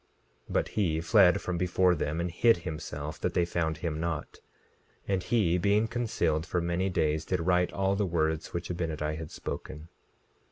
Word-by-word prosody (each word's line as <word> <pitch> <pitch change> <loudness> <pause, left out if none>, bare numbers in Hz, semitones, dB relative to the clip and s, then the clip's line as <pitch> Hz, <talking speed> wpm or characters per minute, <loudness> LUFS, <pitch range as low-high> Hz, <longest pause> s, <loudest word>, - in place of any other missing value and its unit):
17:4 - - -8
But - - +1
he 85 -7 0
fled 95 +2 +5
from 90 -2 -3
before 90 0 +3
them 80 0 -2
and 85 0 -2
hid 115 +5 +4
himself 75 -2 -5
that - - -2
they 85 - +3
found 80 -2 -1
him 80 -1 -3
not. 85 -2 -4 0.7
And 95 -2 +1
he 90 -4 +2
being 105 +4 +3
concealed 110 -10 0
for 85 +1 -1
many 85 +3 0
days 80 -3 0
did 90 +1 -1
write 90 0 +2
all 95 0 0
the 100 -1 0
words 80 -2 -1
which 85 0 -4
Abinadi 80 -3 -2
had 80 -1 -6
spoken. 75 +2 -7
85 Hz, 175 wpm, -29 LUFS, 80-95 Hz, 0.7 s, fled